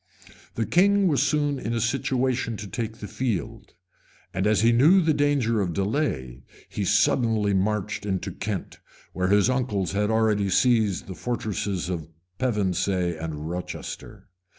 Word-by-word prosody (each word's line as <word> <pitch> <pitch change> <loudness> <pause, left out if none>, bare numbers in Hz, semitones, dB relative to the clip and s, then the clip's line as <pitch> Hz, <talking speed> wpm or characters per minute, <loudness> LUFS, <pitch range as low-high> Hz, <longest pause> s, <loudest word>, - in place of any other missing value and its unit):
The 115 - 0
king 200 - +4
was 145 -5 +2
soon 145 -2 +1
in 115 -1 -3
a - - 0
situation 125 -1 0
to 105 - -7
take 110 +3 -4
the 105 - -7
field; 105 -4 -4 0.6
and 95 +2 0
as 105 0 +3
he 115 +1 +5
knew 150 +11 +6
the 165 -3 +2
danger 140 -7 +1
of 90 -3 -1
delay, 95 - -2 0.3
he 100 - -3
suddenly 105 0 +2
marched 105 +1 -1
into 95 -3 -2
Kent, 100 -3 -5 0.3
where 90 0 0
his 100 +2 +4
uncles 120 -8 0
had 105 +1 0
already 110 -3 +2
seized 110 - +2
the 95 - -7
fortresses 105 -5 -3
of 85 -4 -4 0.3
Pevensey 95 -6 0
and 80 -1 -5
Rochester. 90 +2 -7
105 Hz, 150 wpm, -25 LUFS, 95-125 Hz, 0.6 s, knew